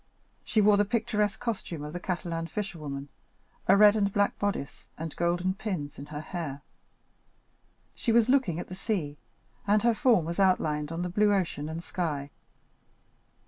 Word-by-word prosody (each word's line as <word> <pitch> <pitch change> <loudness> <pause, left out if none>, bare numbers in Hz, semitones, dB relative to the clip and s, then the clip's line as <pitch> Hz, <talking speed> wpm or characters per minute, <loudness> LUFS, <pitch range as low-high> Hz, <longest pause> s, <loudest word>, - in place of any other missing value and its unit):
She 215 - +2
wore 205 0 +5
the 205 - +4
picturesque 210 -1 0
costume 200 -10 -4
of 150 +1 -6
the 175 - -4
Catalan 170 -2 -3
fisherwomen, 150 -9 -5 0.6
a 195 - +6
red 210 0 +7
and 200 -2 +1
black 205 0 +1
bodice, 200 -9 -3
and 160 -1 -5
golden 175 +2 +1
pins 185 -10 -4
in 140 - -8
her 150 0 -6
hair. 155 -5 -5 1.3
She 235 - -1
was 230 0 +5
looking 250 - +2
at - - -6
the - - -8
sea, 180 -7 -2 0.5
and 210 +1 +3
her 235 0 +4
form 225 -7 +3
was 170 +3 -4
outlined 155 -6 +2
on 165 +1 -2
the 180 - -2
blue 210 +3 +3
ocean 170 -6 -1
and 165 +2 -5
sky. 145 -7 -3
180 Hz, 165 wpm, -28 LUFS, 155-210 Hz, 1.3 s, red